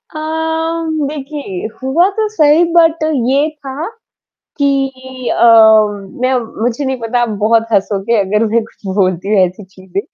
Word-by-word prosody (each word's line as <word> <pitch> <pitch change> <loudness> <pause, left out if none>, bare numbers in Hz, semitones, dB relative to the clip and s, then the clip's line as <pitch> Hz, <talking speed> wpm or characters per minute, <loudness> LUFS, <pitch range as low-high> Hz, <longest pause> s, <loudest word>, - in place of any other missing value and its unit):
अम, 320 +1 -2 0.2
देखिए 280 - -6
हुआ 310 +8 +2
तो 435 -1 +1
सही 305 0 +4
बट 330 -1 +3 0.3
ये 280 +3 +2
था 295 0 -7 0.8
कि 275 -1 +2 0.4
अ, - - +1 0.8
मैं 255 +1 +1 0.3
मुझे 245 +4 -1
नहीं 265 -1 -2
पता 235 +2 -1
आप 240 - 0
बहुत 225 +1 +3
हँसोगे 200 +2 0
अगर 210 +3 +1
मैं 230 0 +2
कुछ 220 - -19
बोलती 190 +1 0
ऐसी 185 +3 -3
चीज़ें। 190 0 -6
265 Hz, 135 wpm, -14 LUFS, 215-310 Hz, 0.8 s, सही